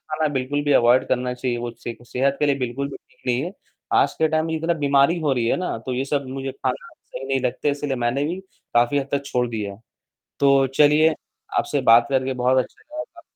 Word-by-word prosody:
खाना 155 0 +1
बिल्कुल 140 +3 -1
भी 145 - +1
अवॉइड 120 +2 +4
करना 125 0 0
चाहिए 125 -1 -2
वो 120 0 -4
से 115 0 -7
सेहत 135 +3 0
के 150 - +2
लिए 140 -1 +2
बिल्कुल 130 +3 -2
भी - - -8
ठीक - - -32
नहीं 125 +1 +1
है। 180 - -4 0.4
आज 395 -1 +3
के 160 - +3
टाइम 155 0 0
में 160 - -3
जितना 165 +2 0
बीमारी 145 +2 +3
हो 145 -4 +1
रही 120 -2 0
है - - +2
ना, 180 -10 -2
तो 125 +3 -5
ये 130 +2 -1
सब 140 -1 -1
मुझे 135 0 -4
खाना 130 +3 -3
सही 135 - -10
नहीं 135 -1 +1
लगते, 130 +3 -1
इसलिए 145 -1 -2
मैंने 120 +3 0
भी 175 +5 -2 0.3
काफ़ी 120 +4 +3
हद 135 - -4
तक 140 0 0
छोड़ 125 -2 0
दिया 105 -3 -4
है। 100 - -16 0.6
तो 140 -1 +5
चलिए 150 +2 +5 0.4
आपसे 145 - 0
बात 120 0 +6
करके 130 0 +1
बहुत 125 +1 +2
अच्छा - - -19
लगा 310 +1 -6
काफी 340 -1 -18
135 Hz, 235 wpm, -22 LUFS, 125-150 Hz, 0.6 s, बात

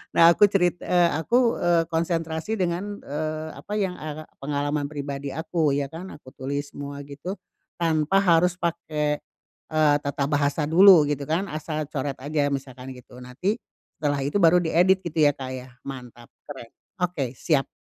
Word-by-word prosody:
nah 165 0 +8
aku - - +3
cerit 180 -3 +2
eee, 175 -1 +3
aku, 235 +9 +2
eee, 170 -1 +3
konsentrasi 165 +3 -1
dengan, 185 +4 -2
eee, 155 +2 -4
apa 210 - -8
yang, 190 -3 -1
eee, 155 0 -6 0.2
pengalaman 145 +1 -1
pribadi 140 -1 -5
aku, 160 -2 0
ya 140 -1 -1
kan? 175 +4 -8
Aku 130 -3 -15
tulis 140 +2 -4
semua 140 0 -6
gitu, 145 +8 -6 0.4
tanpa 165 +1 +2
harus 175 0 +4
pakai, 155 -3 -1 0.5
eee, 155 -2 +4
tata 140 0 -1
bahasa 145 +1 +1
dulu, 180 0 +8
gitu 145 -1 -2
kan? 175 +5 0
Asal 155 0 -3
coret 140 -1 -3
aja, 145 +1 0
misalkan 130 -1 -5
gitu. 125 0 -14
Nanti, 145 - -2 0.4
setelah 145 -2 0
itu 145 +8 0
baru 175 +1 +6
diedit, 180 +4 +3
gitu, 165 -2 -4
ya 145 - +4
Kak, 130 -1 -6
ya? 130 0 -9 0.2
Mantap, 125 -3 -9 0.2
keren. 125 -5 -9 0.3
Oke, 165 -9 -1
siap. 145 -4 +1
155 Hz, 160 wpm, -25 LUFS, 140-170 Hz, 0.5 s, nah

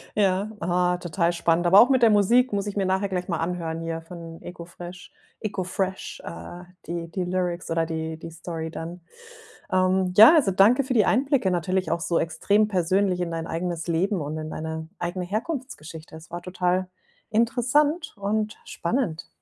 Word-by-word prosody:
Ja, 200 0 +1
ah, 180 +1 +1
total 175 0 0
spannend. 170 0 +1
Aber 190 +4 +8
auch 245 - +5
mit 260 -3 +3
der 225 - +7
Musik, 235 +4 +4
muss 200 0 -1
ich 205 - -4
mir 195 - +1
nachher 190 +1 0
gleich 180 -1 -3
mal 165 -3 -1
anhören 165 -1 -3
hier 165 0 -4
von 165 -1 -10
Eko 175 -1 -8
Fresh. 175 +1 -10 0.3
Eko 205 -3 -3
Fresh, 190 +1 -3
äh, 175 +1 -8 0.2
die 170 0 -4
die 185 +2 -3
Lyrics 180 -2 -2
oder 165 0 +1
die 160 0 -4
die 165 - -8
Story 165 -1 -5
dann. 170 +2 -7 0.7
Ähm, 185 0 +2
ja, 225 - +10
also, 260 -11 +4
danke 220 +8 +5
für 260 - -2
die 220 -4 +4
Einblicke, 265 -4 +2
natürlich 185 +2 0
auch 170 - +1
so 170 0 0
extrem 200 +6 +2
persönlich 185 -1 +1
in 170 - -2
dein 165 0 -4
eigenes 170 0 -3
Leben 175 +2 0
und 150 +2 -4
in 155 0 -5
deine 160 0 -5
eigene 175 +1 -3
Herkunftsgeschichte. 210 - -5
Es 160 +2 -12
war 175 +1 -5
total 180 0 0 0.4
interessant 255 +8 +2
und 210 +2 -1
spannend. 170 -4 -2
180 Hz, 180 wpm, -25 LUFS, 165-205 Hz, 0.7 s, ja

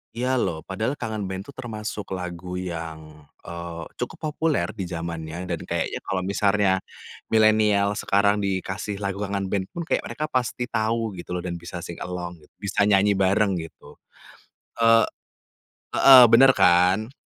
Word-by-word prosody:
Iya 130 +2 0
loh, 80 -8 -2
padahal 110 +8 -2
Kangen 110 -7 -4
Band 95 +1 -5
itu 140 - -12
termasuk 110 -6 -6
lagu 90 0 -6
yang, 80 -4 -7 0.2
eee, 85 -1 -7 0.2
cukup 150 +5 -4
populer 155 -1 0
di 95 -5 -5
zamannya 85 0 -5
dan 85 -3 -3
kayaknya - - -2
kalau 95 - -3
misarnya 100 0 +2 0.5
milenial 110 -2 +3
sekarang 100 0 +2
dikasih 100 +1 -3
lagu 100 0 -3
Kangen 100 -2 -3
Band 95 -2 -1
pun 170 - -6
kayak 165 - -1
mereka 155 - -3
pasti 125 -1 -1
tahu 110 0 0
gitu 90 +1 -6
loh, 90 - -4
dan 85 -1 -4
bisa 85 0 -8
sing 85 -2 -8
along, 90 -1 -6 0.2
bisa 100 +1 0
nyanyi 100 0 +3
bareng 95 0 +2
gitu. 80 0 -12 0.8
Eee 115 0 +6 0.9
heeh, 130 -2 +9
benar 135 +3 +8
kan. 95 +7 +4
100 Hz, 150 wpm, -24 LUFS, 90-110 Hz, 0.9 s, heeh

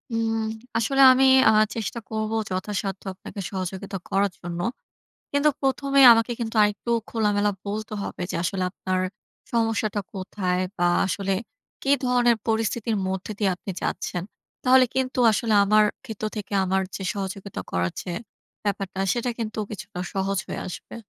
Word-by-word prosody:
উম 225 0 0 0.4
আসলে 270 +4 +2
আমি 265 +1 +4 0.2
আ - - +7 0.2
চেষ্টা 230 +1 -3
করবো 220 0 -2
যথাসাধ্য 195 0 -3
আপনাকে 200 - -10
সহযোগিতা 190 +1 -4
করার 200 0 +2
জন্য। 175 0 -5 0.7
কিন্তু 285 +1 +3
১ম 275 +1 0
এ - - +9
আমাকে 230 +1 +2
কিন্তু 225 0 -3
আরেকটু 210 +3 0 0.2
খোলামেলা 210 -2 +2 0.2
বলতে 215 +1 -4
হবে - - -5
যে - - -2
আসলে 185 +1 -1
আপনার 185 -1 -2 0.5
সমস্যাটা 225 -2 +1
কোথায় 185 -1 -2 0.2
বা 175 0 +3 0.2
আসলে 195 0 -1 0.5
কি 275 - 0
ধরনের 245 -1 +4
পরিস্থিতির 225 0 0
মধ্যে 190 +3 -3
দিয়ে 200 -3 +2
আপনি 195 - -7
যাচ্ছেন? 175 - -2 0.4
তাহলে 255 0 +7
কিন্তু 260 0 -1
আসলে 220 0 +1
আমার 215 +1 +5 0.2
ক্ষেত্র 220 -3 -6
থেকে 210 -1 -6
আমার 190 +1 +1
যে 195 - -6
সহযোগিতা 195 0 -5
করার 90 0 0
যে 180 - -6 0.5
ব্যাপারটা 195 -2 -2
সেটা 240 0 -1
কিন্তু 220 -1 -4
কিছুটা 210 -2 -7 0.2
সহজ 195 0 0
হয়ে - - -5
আসবে। 180 - -8
210 Hz, 150 wpm, -25 LUFS, 190-225 Hz, 0.7 s, এ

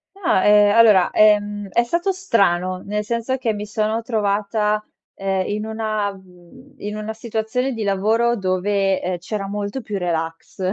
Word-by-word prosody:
No, 350 - +1
ehm, 210 0 +5
allora, 215 -6 +6
ehm, 205 -1 +3
è 235 - +2
stato 340 +10 0
strano. 185 - +1
Nel 210 +1 -2
senso 235 +4 -2
che 245 -4 -1
mi 210 0 -5
sono 215 +2 -1
trovata, 210 -1 0 0.3
ehm, 195 -1 -1
in 210 +1 -3
una 215 -2 -2
mhmm, 190 +8 -18
in 210 -3 -5
una 215 +1 -4
situazione 225 +3 -2
di 225 - -5
lavoro 220 +4 +1
dove, 195 0 0
ehm, 180 0 -2
c'era 195 +3 -5
molto 205 +5 -4
più 210 -3 -4
relax; 165 -2 -4
210 Hz, 155 wpm, -21 LUFS, 195-225 Hz, 0.3 s, allora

